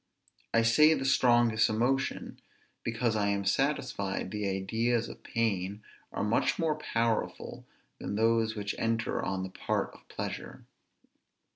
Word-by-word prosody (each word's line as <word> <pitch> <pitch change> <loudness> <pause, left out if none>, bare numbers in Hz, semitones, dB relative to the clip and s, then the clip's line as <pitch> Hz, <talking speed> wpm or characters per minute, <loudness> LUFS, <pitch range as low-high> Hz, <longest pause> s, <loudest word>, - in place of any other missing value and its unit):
I 115 - +3
say 150 +7 +6
the 135 - -3
strongest 120 -4 +4
emotion, 125 +5 -1 0.4
because 115 0 0
I 105 -1 +1
am 100 -1 0
satisfied 105 -6 -1
the 105 -2 -2
ideas 115 +5 0
of - - -10
pain 105 -3 -2 0.3
are - - -2
much 105 +3 +1
more 160 -3 +1
powerful 115 -6 -2 0.3
than - - -4
those 115 0 +2
which 105 -1 -3
enter 115 0 0
on 95 -1 -2
the 95 - -6
part - - -2
of - - -18
pleasure. - - -6
115 Hz, 135 wpm, -30 LUFS, 100-120 Hz, 0.4 s, say